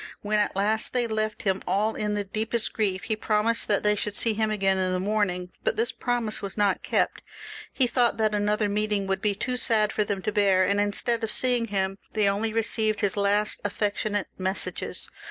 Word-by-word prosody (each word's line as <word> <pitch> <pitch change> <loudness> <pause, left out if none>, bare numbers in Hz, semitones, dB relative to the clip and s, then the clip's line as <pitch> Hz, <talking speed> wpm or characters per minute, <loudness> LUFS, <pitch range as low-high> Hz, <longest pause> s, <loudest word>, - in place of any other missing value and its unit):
When 210 0 +1
at 205 - 0
last 215 +3 +1
they 245 -1 +2
left 215 -1 -2
him, 190 -1 0
all 215 +3 +1
in 210 -1 -2
the 205 - -1
deepest 220 +3 -2
grief, 195 -4 -1
he 220 - -1
promised 215 +2 +1
that 205 -2 +1
they 210 0 +4
should 210 0 -2
see 225 +1 +2
him 220 0 0
again 195 -2 +1
in 185 -1 0
the 185 - 0
morning; 185 -3 -1
but - - 0
this 455 +2 0
promise 240 -3 -2
was 200 +1 -6
not 200 -3 +2
kept. - - 0 0.5
He 260 - +2
thought 240 -1 +1
that 215 -1 +1
another 210 +1 +1
meeting 210 -1 -1
would 195 0 -1
be 210 -2 0
too 250 +4 -2
sad 220 -3 +2
for 210 - +1
them 200 -2 -3
tobeax, 200 -3 +3
and 200 +1 +2
instead 225 +3 0
of 225 - -1
seeing 245 0 +2
him 195 -2 -2
they 215 -2 +2
only 205 +3 +1
re 225 +1 +1
ceived 215 -1 -1
his 205 -3 +1
last 205 +1 +1
affectionate 205 0 -1
messages. 190 +1 -1
210 Hz, 210 wpm, -26 LUFS, 200-220 Hz, 0.5 s, they